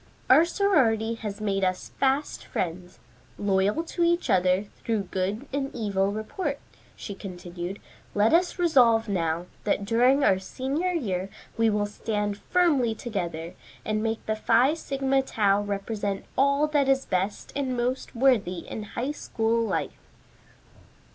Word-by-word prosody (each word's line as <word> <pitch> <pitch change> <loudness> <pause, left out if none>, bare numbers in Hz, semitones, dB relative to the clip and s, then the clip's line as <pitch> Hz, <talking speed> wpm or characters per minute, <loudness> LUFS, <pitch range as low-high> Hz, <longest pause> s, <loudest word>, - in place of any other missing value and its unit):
"Our 305 +6 +8
sorority 260 - +2
has 210 -3 -6
made 195 -2 -1
us 185 0 -1
fast 275 +2 0
friends, 180 +1 -4 0.4
loyal 200 +7 +1
to 340 +1 -2
each 345 +1 +2
other, 185 +1 +3
through 210 0 -3
good 195 +7 -2
and 275 -1 -1
evil 200 -3 0
report," 275 - -3 0.4
she 205 - -7
continued. 180 -1 -7 0.4
"Let 210 +5 +3
us 350 +2 +3
resolve 245 -10 +4
now, 170 -3 -1 0.2
that 200 - 0
during 250 +6 +4
our 190 -7 +4
senior 270 - -2
year 195 - -2 0.3
we 225 0 +3
will 210 -1 +1
stand 205 -1 -3
firmly 285 -11 +2
together, 175 -7 -4 0.3
and 215 0 0
make 225 0 -2
the 215 - 0
Phi 235 +6 +3
Sigma 270 -4 0
Tau 205 -6 +2
represent 205 0 -3
all 280 +2 +3
that 285 -3 +2
is 270 0 +2
best 190 +2 -2
and 265 -3 -1
most 250 +2 -2
worthy 220 -9 +2
in - - -5 0.2
High 255 +5 0
School 230 -5 -1
life." 225 - -3
220 Hz, 140 wpm, -26 LUFS, 195-270 Hz, 0.4 s, Our